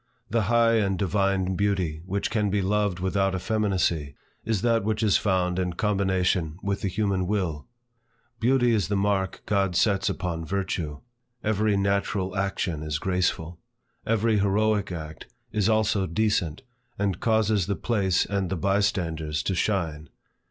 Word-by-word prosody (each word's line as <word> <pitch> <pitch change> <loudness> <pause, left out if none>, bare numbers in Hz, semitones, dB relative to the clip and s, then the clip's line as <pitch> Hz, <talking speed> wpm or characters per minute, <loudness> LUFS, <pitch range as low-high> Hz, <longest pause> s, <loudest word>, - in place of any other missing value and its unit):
The 115 0 +2
high 115 -1 +4
and 100 -3 +1
divine 95 0 +1
beauty 95 -6 0
which 100 +3 -2
can 105 -2 +1
be 100 0 0
loved 100 -2 0
without 95 +1 0
effeminacy, 90 -7 0 0.3
is 110 -3 -1
that 115 -2 +2
which 110 +1 -1
is 105 -3 +4
found 90 -2 0
in 90 -1 -1
combination 95 -5 0
with 100 0 -1
the 100 - -1
human 95 -1 0
will. 90 -7 -2 0.7
Beauty 125 0 +3
is 105 -4 +1
the 100 - -1
mark 100 -1 0
God 100 -3 +1
sets 95 0 +2
upon 85 -2 -3
virtue. 85 -4 -3 0.4
Every 105 -1 +1
natural 100 -1 0
action 95 -5 -1
is 75 -1 -2
graceful. 90 -1 -1 0.4
Every 115 -1 +2
heroic 105 0 +1
act 80 -2 -7 0.2
is 110 0 +1
also 110 -3 +2
decent, 90 -3 0 0.3
and 100 -3 -1
causes 110 -4 +2
the 100 - 0
place 100 -7 +1
and 100 -2 -2
the 95 - -1
bystanders 85 -5 0
to 95 - -1
shine. 85 -5 -1
95 Hz, 145 wpm, -26 LUFS, 90-105 Hz, 0.7 s, high